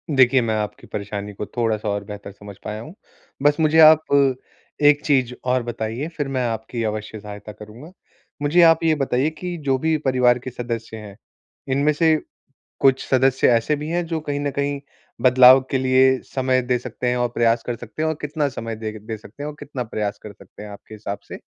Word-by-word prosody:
देखिए, 130 0 +5
मैं 110 -2 -1
आपकी 105 -1 -4
परेशानी 100 0 -5
को 105 - -5
थोड़ा-सा 110 -2 -2
और 100 0 -2
बेहतर 100 0 -9
समझ 100 0 -12
पाया 105 +1 -5
हूँ। 155 +8 -10 0.5
बस 145 +2 +3
मुझे 160 0 +3
आप 155 0 +6 0.8
एक 145 0 +5
चीज़ 130 -4 +2
और 125 0 +1
बताइए, 120 +4 -4
फिर 155 -4 -4
मैं 130 -2 -1
आपकी 115 +1 -4
अवश्य 110 0 -4
सहायता 105 +1 -9
करूँगा। 110 +10 -12 0.5
मुझे 150 +5 +3
आप 165 -1 +5
ये 160 -1 +3
बताइए 135 0 0
कि 175 +3 -6
जो 135 -1 +2
भी 160 +3 +1
परिवार 125 -2 +3
के 130 - -7
सदस्य 115 -2 -5
हैं, 105 -2 -10 0.5
इनमें 140 +3 +2
से 160 +1 +3 0.6
कुछ 135 -1 +3
सदस्य 130 0 +3
ऐसे 115 +6 +2
भी 150 +1 -6
हैं 175 +1 -1
जो 165 -1 -3
कहीं 145 -2 -4
न 145 0 -2
कहीं 140 +1 -2 0.4
बदलाव 130 +1 +7
के 135 - +2
लिए 130 0 +4
समय 130 -1 0
दे 125 0 0
सकते 125 - -5
हैं 125 - 0
और 120 0 +1
प्रयास 115 -1 +1
कर 120 - -2
सकते 120 +5 -8
हैं 160 - +1
और 160 - -2
कितना 150 0 -1
समय 115 -3 -6
दे 110 0 -5
दे 110 +1 -6
सकते 110 +6 -11
हैं? 150 - -3
और 150 - -9
कितना 135 -3 -5
प्रयास 105 -3 -3
कर 105 - -9
सकते 100 +1 -14
हैं 105 - -9
आपके 100 +1 -12
हिसाब 100 -1 -6
से? - - -8
125 Hz, 205 wpm, -21 LUFS, 110-145 Hz, 0.8 s, बदलाव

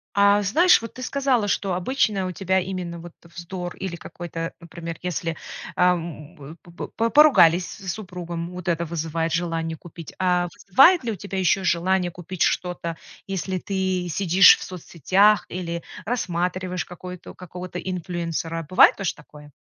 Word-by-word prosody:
А, 200 0 +5
знаешь, 315 - +4
вот 230 - -8
ты 255 - -7
сказала, 260 -5 +1
что 195 -2 0
обычно 200 0 0
у 185 - -3
тебя 190 +1 0
именно 180 -2 -5
вот 170 0 -11
вздор 175 +1 -7
или 190 -3 -5
какой-то, 165 -1 -6
например, 170 0 -8
если, 165 -2 -3 0.4
ам, 165 -4 -1
по 175 - -15
по 170 - -7
по 230 +1 -1
поругались 185 - +6
с, 190 -4 -6
супругом, 175 -4 -6
вот 180 0 -9
это 170 -1 0
вызывает 165 0 -2
желание 165 -1 -2
купить. 165 -1 -11
А 180 -1 +1 0.2
вызывает 275 - +6
ли 235 - -2
у - - -3
тебя 195 +1 -6
ещё 190 +1 +2
желание 180 +1 +1
купить 175 +1 -9
что-то, 170 -2 0 0.3
если 190 -1 -3
ты 190 -1 -2
сидишь 185 +2 +6
в - - -8
соцсетях 185 +4 +2
или 170 -1 -5 0.2
рассматриваешь 180 -4 -2
какой-то 180 0 -10
какого-то 180 0 -8
инфлюэнсера? 170 -3 -4
Бывает 185 - +6
тоже 195 - -2
такое? 150 -1 -15
180 Hz, 155 wpm, -23 LUFS, 170-190 Hz, 0.4 s, поругались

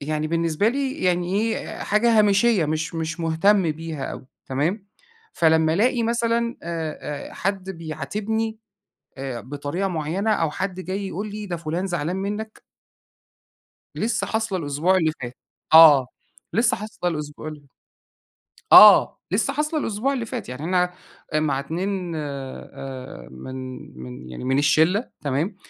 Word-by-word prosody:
يعني 155 +1 -2
بالنسبة 165 +4 +1
لي 270 +2 -2
يعني 180 0 +1
إيه 225 0 -2
حاجة 225 +2 +3
هامشية 205 -2 +4
مش 155 +3 -2
مش 165 +1 -3
مهتم 170 +3 +3
بيها 160 -2 -6
اوي، 130 - -7 0.2
تمام؟ 165 +10 -1 0.5
فلمّا 160 -1 +3
ألاقي 240 +4 +2
مثلًا 235 0 0
آآ، 160 -3 -5
آآ، - - -13
حد 195 -1 -2
بيعاتبني 200 +7 -3 0.6
آآ، 130 -3 -4
بطريقة 145 - -3
معينة 175 +5 -1
أو 165 -6 +1
حد 185 +4 -3
جاي 190 +3 -4
يقول 200 +4 -5
لي 210 0 -6
ده 175 -3 -3
فلان 165 +3 -3
زعلان 175 -1 -2
منك 210 +3 -4 1.3
لسه 225 0 -1
حاصلة 220 -4 -1
الأسبوع 155 +4 +1
اللي 160 -3 +2
فات، 120 0 -6 0.4
آه، 150 -5 +9 0.5
لسه 230 +3 +2
حاصلة 210 -3 -3
الأسبوع 150 -1 -6
اللي 150 -2 -9 1.0
آه، - - +9
لسّه 225 +8 +1
حاصلة 300 +2 -1
الأسبوع 245 +2 -1
اللي 245 -4 -2
فات 220 - -6
يعني 125 +4 -6
أنا 180 +1 +1 0.4
آآ، 155 - +3
مع 145 -3 0
2 175 +4 -3
آآ، 135 - -7
من 65 - -8 0.5
من 65 0 -9
يعني 65 - -8
من 130 +1 +1
الشِّلة، 160 - +3
تمام؟ 150 +8 -1
170 Hz, 140 wpm, -23 LUFS, 150-205 Hz, 1.3 s, آه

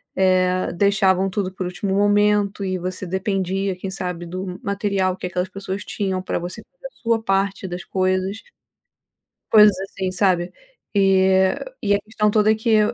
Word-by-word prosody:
eh, 185 -1 +2
deixavam 195 0 +2
tudo 185 -1 -2
por 185 - -4
último 190 +2 -2
momento 205 0 +2
e 185 -1 -1
você 185 +1 -4
dependia, 190 0 -1
quem 190 +1 -5
sabe, 180 -2 -4
do 185 +1 -6
material 200 -3 0
que 185 - -4
aquelas 180 +1 -2
pessoas 195 +1 -5
tinham, 190 -3 -2
para - - -2
você 175 +1 -6
fazer - - -10
a - - -19
sua 230 -1 +1
parte 195 0 0
das 175 0 -6
coisas, 185 +2 -1 1.1
coisas 210 -3 +7
assim, 190 -1 -4
sabe, 180 -2 +1 0.4
e 190 -1 +4 0.5
e 205 0 +3
a - - 0
questão 215 -1 0
toda 215 0 +4
é 220 - +3
que 220 0 +2
195 Hz, 160 wpm, -21 LUFS, 185-205 Hz, 1.1 s, coisas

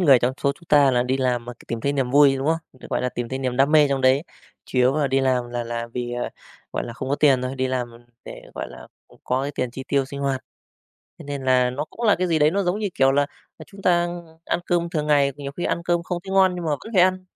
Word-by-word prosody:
người 140 -8 +6
trong 125 +2 0
số 140 - +2
chúng 170 - -20
ta 145 -2 +6
là 125 -1 +2
đi 130 +1 0
làm, 125 -2 -1
ờ, 125 - -5
c 120 - -19
tìm 115 - -4
thấy 140 +4 0
niềm 135 -3 -1
vui, 140 0 +6
đúng 135 +2 -3
không? 165 +1 +2
Ừ, 130 - -13
gọi - - 0
là, 125 - +1
tìm 120 -1 -5
thấy 130 - -3
niềm 130 -2 -2
đam 135 +3 +3
mê 150 -2 +6
trong 135 -1 0
đấy, 130 +2 +4 0.4
chủ 130 - -3
yếu 130 +3 +4
là 150 - +2
đi 135 0 +1
làm 130 -2 +1
là 120 -1 -3
là 115 0 -4
vì, 120 0 -4
ờ, 120 0 -2 0.4
gọi - - -2
là, 120 - -7
không 130 +2 -6
có 140 - +2
tiền 135 -4 +4
thôi, 130 +1 -3
đi 130 0 0
làm 125 -2 -2 0.3
để, - - -9
gọi - - -5
là, - - -12 0.2
ừm, - - -20
có 130 +1 0
cái 140 - -2
tiền 125 -1 -2
chi 130 +2 -8
tiêu 140 -1 +2
sinh 140 +1 -7
hoạt. 135 -2 -1 0.8
Thế - - -10
nên 140 -2 -5
là 125 -1 +3
nó 140 +4 -3
cũng 235 - -3
là 210 - +6
cái 185 - +1
gì 165 -2 +2
đấy 150 0 +4
nó 200 +4 0
giống 180 +2 0
như, 210 -2 -1
kiểu, 135 0 +4
là, 145 0 +2 0.3
à, - - -10
chúng 195 0 -14
ta 175 -1 +3 0.4
ăn - - -1
cơm 170 -1 0
thường 150 -3 -2
ngày 140 -2 +3
thì 145 +2 -12
nhiều 140 - -5
khi 175 - -5
ăn 170 - -1
cơm 175 -1 +1
không 180 0 -3
thấy 190 - -6
ngon, 190 -1 +5
nhưng 175 -1 -5
mà 160 - -1
vẫn 185 +10 -4
phải 180 - +6
ăn, 185 0 +2
140 Hz, 305 wpm, -23 LUFS, 130-160 Hz, 0.8 s, người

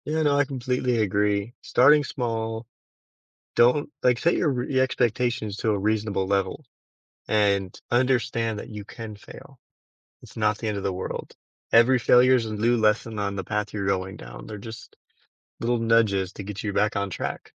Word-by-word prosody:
Yeah, 155 +1 0
no, 145 -1 +3
I 145 - +3
completely 125 -2 -1
agree. 105 +1 0
Starting 145 +4 +5
small, 115 -4 -3 0.9
don't, 125 +5 +3
like, 125 -1 +3
set 170 +7 +2
your 165 - +1
re 125 0 -2
your 130 - +5
expectations 120 -4 -1
to 110 - -1
a 105 - +1
reasonable 105 -1 0
level, 100 0 -1 0.6
and 100 -3 +1
understand 120 -3 +1
that - - -9
you 105 -2 -8
can 110 -1 -8
fail, - - -14 0.6
it's - - -15
not 105 -1 +1
the 115 - -3
end 105 -1 -1
of 100 - -5
the 95 - -1
world. 95 +1 -6 0.4
Every 120 +3 +6
failure 125 +2 +5
is 120 -3 0
a 110 - -5
new 115 +3 +2
lesson 110 0 +1
on 100 -1 -2
the 95 - -3
path 105 +1 -3
you're 100 -2 -2
going 95 -1 -1
down. - - -10
They're 105 - -7
just 115 +3 -10 0.7
little 120 +1 0
nudges 110 -5 +2
to - - -7
get 100 0 -6
you 105 - -2
back 105 +1 +1
on 100 0 -1
track. - - -5
110 Hz, 180 wpm, -25 LUFS, 105-125 Hz, 0.9 s, Every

